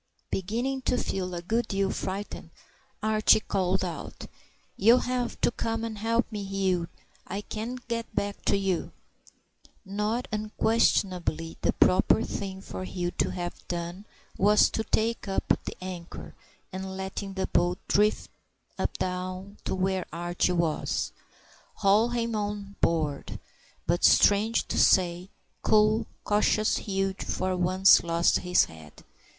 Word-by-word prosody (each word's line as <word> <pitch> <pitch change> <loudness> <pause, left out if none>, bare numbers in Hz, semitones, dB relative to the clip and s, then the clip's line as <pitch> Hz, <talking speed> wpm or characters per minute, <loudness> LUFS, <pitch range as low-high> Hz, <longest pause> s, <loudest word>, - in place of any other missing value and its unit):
Beginning 240 +8 -2
to 250 - 0
feel 185 -5 -2
a 170 - -5
good 225 +5 0
deal 195 -1 0
frightened, 190 -3 -5 0.5
Archie 215 0 +4
called 190 -2 0
out, 170 -3 -6 0.5
"You'll 230 +5 +5
have 250 -1 -2
to - - +3
come 225 -1 -2
and 220 -2 -4
help 230 +2 +1
me, 210 -2 -4
Hugh. 190 -3 0 0.4
I 200 +3 -4
can't 235 +4 -6
get 230 -1 -4
back 200 0 -2
to - - +3
you." 195 -3 -1 0.9
Now 210 +5 -1
unquestionably 200 -6 0
the - - +2
proper 190 +4 +4
thing 190 -3 -5
for 185 - -7
Hugh 175 -1 -3
to - - -1
have 175 -1 -4
done 175 +3 -4 0.3
was 210 +2 +5
to 220 - -1
take 225 0 0
up 195 - -1 0.2
the - - -6
anchor, 180 -2 -7 0.4
and 190 0 -5
letting 190 +1 -5
the 190 -1 0
boat 175 0 +1
drift 210 +1 +2 0.7
down 185 +2 -4
to - - -1
where 190 0 -1
Archie 175 +2 0
was, 170 -3 -1 0.6
haul 210 +4 +3
him 235 -1 -1
on 205 -1 -4
board. 155 -4 0 0.5
But 175 +2 0
strange 215 +3 +4
to - - 0
say, 180 0 +3 0.3
cool, 215 +1 +3 0.2
cautious 215 +1 +2
Hugh 195 -2 -1
for 185 0 -1
once 185 +2 +5
lost 170 0 +2
his 180 0 +3
head. 80 -2 -14
195 Hz, 135 wpm, -27 LUFS, 180-215 Hz, 0.9 s, You'll